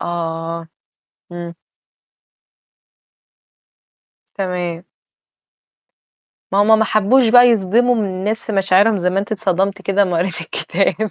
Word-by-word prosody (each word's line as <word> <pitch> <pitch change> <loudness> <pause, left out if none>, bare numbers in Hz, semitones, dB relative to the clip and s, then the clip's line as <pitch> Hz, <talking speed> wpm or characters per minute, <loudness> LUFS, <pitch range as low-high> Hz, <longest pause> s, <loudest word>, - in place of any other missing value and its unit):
آه. 165 -1 -5 0.6
إمم. 175 -1 -7 2.8
تمام. 180 -3 -4 1.7
ما 195 - +1
هُم 220 +1 +4
ما 220 - +2
حبوش 225 +4 +2
بقى 245 +1 +6
يصدموا 230 +3 +2
الناس 205 +1 -3
في 220 - -4
مشاعرهم 195 +2 +3
زي 180 -1 -1
ما 190 - -1
أنتِ 205 +3 -3
اتصدمتِ 195 -1 -1
كدهِ 200 +1 +1
اما 180 -3 -1
قريتِ 180 0 -2
الكتاب. 195 +5 -2
195 Hz, 110 wpm, -17 LUFS, 175-215 Hz, 2.8 s, بقى